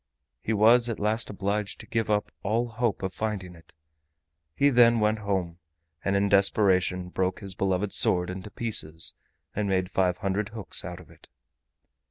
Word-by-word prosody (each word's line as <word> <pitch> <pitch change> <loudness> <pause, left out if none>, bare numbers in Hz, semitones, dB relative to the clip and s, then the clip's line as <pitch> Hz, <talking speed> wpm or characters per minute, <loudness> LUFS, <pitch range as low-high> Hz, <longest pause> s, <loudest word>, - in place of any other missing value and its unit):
He - - -3
was 115 +3 +5
at 115 - -4
last 110 +2 0
obliged 100 0 -3
to - - -9
give 115 -1 -2
up 105 -1 0
all 115 +4 0
hope 115 -2 -2
of 95 0 -3
finding 100 -5 -4
it. 85 -1 -18 0.8
He 140 0 +3
then 120 -2 +5
went 105 0 +1
home, 95 -5 -2 0.4
and 100 - 0
in 100 +1 +2
desperation 95 -2 +2
broke 90 0 -1
his 100 -2 -6
beloved 95 +1 -1
sword 90 0 +3
into 95 +3 -7
pieces 85 -8 0 0.4
and 105 -1 -1
made 95 -1 0
five 90 -1 +1
hundred 100 +1 -2
hooks 110 -3 -6
out 90 0 -7
of 90 - -16
it. - - -18
100 Hz, 170 wpm, -27 LUFS, 95-110 Hz, 0.8 s, was